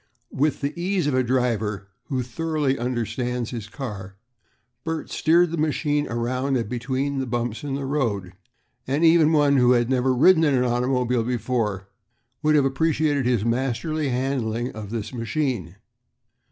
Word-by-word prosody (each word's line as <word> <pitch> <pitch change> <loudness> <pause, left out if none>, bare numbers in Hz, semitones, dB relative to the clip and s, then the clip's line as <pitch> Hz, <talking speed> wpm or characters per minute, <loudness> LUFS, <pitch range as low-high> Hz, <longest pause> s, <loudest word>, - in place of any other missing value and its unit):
With 145 +3 0
the 140 +1 -1
ease 180 0 -1
of 145 - 0
a 130 - +3
driver 115 -6 -1 0.2
who 130 -2 -2
thoroughly 150 +1 -1
understands 125 0 -2
his 115 -4 -6
car, 105 -8 -7 0.7
Bert 160 -1 -4
steered 170 +1 +3
the 170 - -2
machine 150 -1 0
around 125 +3 -1
and 115 - -2
between 130 +4 -2
the 130 - -2
bumps 120 0 -3
in 140 -2 -3
the 140 0 -3
road, 110 -10 -1 0.5
and 145 +5 +2
even 160 -1 +5
one 145 -3 +4
who 125 -1 +5
had 120 +1 +1
never 130 0 +2
ridden 160 +5 +5
in 145 -3 +3
an 125 - +2
automobile 125 0 +1
before 115 -5 -2 0.5
would 155 0 +3
have 145 -2 +4
appreciated 145 -1 +1
his 120 -4 +1
masterly 135 +5 -1
handling 125 -2 -1
of 110 -2 -8
this 110 +1 -5
machine. 115 - -2
130 Hz, 155 wpm, -24 LUFS, 115-145 Hz, 0.7 s, even